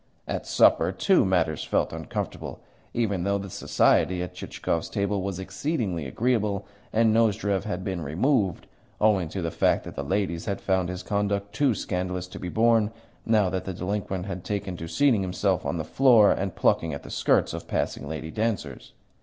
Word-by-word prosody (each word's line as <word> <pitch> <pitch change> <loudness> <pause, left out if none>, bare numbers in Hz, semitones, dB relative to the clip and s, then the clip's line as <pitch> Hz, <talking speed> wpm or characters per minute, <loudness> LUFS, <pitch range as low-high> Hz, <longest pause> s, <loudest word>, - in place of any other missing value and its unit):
At - - -3
supper, - - +4
too, 190 -2 +3
matters 85 -5 +1
felt - - 0
uncomfortable, - - -5 0.3
even 100 -6 0
though 100 +1 +1
the 100 -1 -7
society 90 +1 +2
at 90 - -7
Chichikov's 85 -1 -3
table 100 -1 -1
was 95 -1 -3
exceedingly 95 - -2
agreeable 105 - 0 0.3
and 110 0 +3
Nozdrev 105 -3 +2
had 95 -3 -3
been 95 -3 -3
removed, 95 - 0 0.3
owing 100 -6 +3
to 95 +2 -4
the 85 - -2
fact - - +2
that - - -8
the - - -4
ladies 95 -4 -1
had 100 -1 -2
found 95 -2 0
his 90 0 -5
conduct 100 0 -1
too 130 0 +2
scandalous 90 -1 -3
to - - -9
be 90 - -4
borne, 115 0 +3 0.4
now 110 -3 +4
that 95 - -3
the 95 - -4
delinquent 95 0 -3
had 95 -3 -5
taken 100 -3 -3
to 85 - -6
seating 115 +5 +3
himself 95 0 0
on 85 - -1
the 80 - -2
floor 120 - +5
and 95 -2 -1
plucking 80 -3 +1
at - - -9
the - - -9
skirts - - +2
of - - -6
passing - - -2
lady 80 0 -5
dancers. 105 - -3
95 Hz, 180 wpm, -26 LUFS, 90-105 Hz, 0.4 s, floor